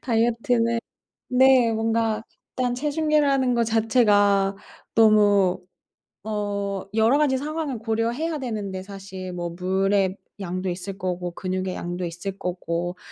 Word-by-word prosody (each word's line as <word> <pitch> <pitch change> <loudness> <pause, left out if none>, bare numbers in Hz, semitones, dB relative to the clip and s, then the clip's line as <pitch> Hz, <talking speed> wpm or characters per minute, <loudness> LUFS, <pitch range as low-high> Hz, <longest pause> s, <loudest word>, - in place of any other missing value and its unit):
다이어트는 235 0 +1 0.5
네. 255 -2 +5
뭔가 225 0 0 0.3
일단 250 -1 +1
체중계라는 290 -2 +1
거 235 - +2
자체가 205 -4 +3 0.4
너무 205 -4 +4 0.6
어 200 -2 -3
여러 225 +5 +4
가지 290 -3 +2
상황을 295 -3 -3
고려해야 235 +8 -1
되는데 210 -7 -4
사실 190 -2 -8
뭐 175 -1 -4
물의 190 +2 +1 0.2
양도 185 0 -3
있을 190 +2 -6
거고 180 -1 -3
근육의 185 +1 -3
양도 175 +1 -4
있을 175 +3 -5
거고 175 -1 -3
210 Hz, 255 characters per minute, -24 LUFS, 185-240 Hz, 0.6 s, 네